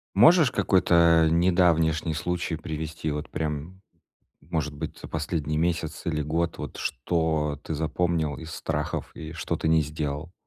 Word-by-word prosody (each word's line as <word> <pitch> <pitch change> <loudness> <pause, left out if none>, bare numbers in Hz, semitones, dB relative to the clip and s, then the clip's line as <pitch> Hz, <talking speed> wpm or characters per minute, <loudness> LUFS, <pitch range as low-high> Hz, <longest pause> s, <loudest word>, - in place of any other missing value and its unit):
Можешь 145 - +7
какой-то, 85 -5 +4
э, - - +2
недавнишний 85 -2 +3
случай 85 +1 -2
привести? 80 -1 -4
Вот 75 +1 -4
прям, 80 +4 -4 0.6
может 75 -1 -3
быть, 80 +1 -6
за - - -9
последний 75 -1 -2
месяц 80 -3 -1
или 75 -2 0
год, 85 +3 -1
вот - - -7
что 75 0 -1
ты 80 - -4
запомнил 80 -1 0
из 80 0 -8
страхов 75 0 -3
и 80 0 -7
что 85 0 -3
ты 80 - -1
не 80 -1 +4
сделал? 75 +2 -4
80 Hz, 150 wpm, -26 LUFS, 75-85 Hz, 0.6 s, Можешь